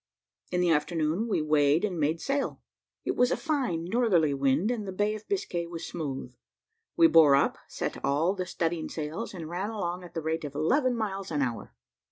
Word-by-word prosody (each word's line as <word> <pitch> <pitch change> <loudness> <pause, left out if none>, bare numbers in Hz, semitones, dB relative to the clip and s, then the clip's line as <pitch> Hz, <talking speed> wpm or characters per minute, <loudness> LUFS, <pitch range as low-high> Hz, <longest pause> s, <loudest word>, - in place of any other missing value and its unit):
In 180 - 0
the 175 -1 +3
afternoon, 160 +6 +1
we 205 -8 0
weighed 150 +2 +3
and 180 -5 -3
made 155 +2 +1
sail. 275 +5 -2 0.4
It - - 0
was 250 0 +4
a - - 0
fine 265 - -1
northerly 180 -8 +2
wind, 140 - +2
and 215 -5 -3
the - - -3
Bay 205 +3 0
of 215 0 -8
Biscay 175 - -2
was 170 -1 -6
smooth. 135 -6 -5 0.6
We 335 - +7
bore 160 - +7
up, 140 - +2
set - - -4
all 150 +7 +2
the 185 -2 -4
studding 165 -1 -2
sails, 160 +8 -4
and 165 -3 -6
ran 180 +5 -3
along 180 -5 -3
at 175 - -12
the 165 - -1
rate 160 +1 -1
of 145 -1 -6
eleven 255 - +2
miles 195 -3 -3
an 150 -3 0
hour. 120 -3 -4
170 Hz, 200 wpm, -28 LUFS, 155-210 Hz, 0.6 s, We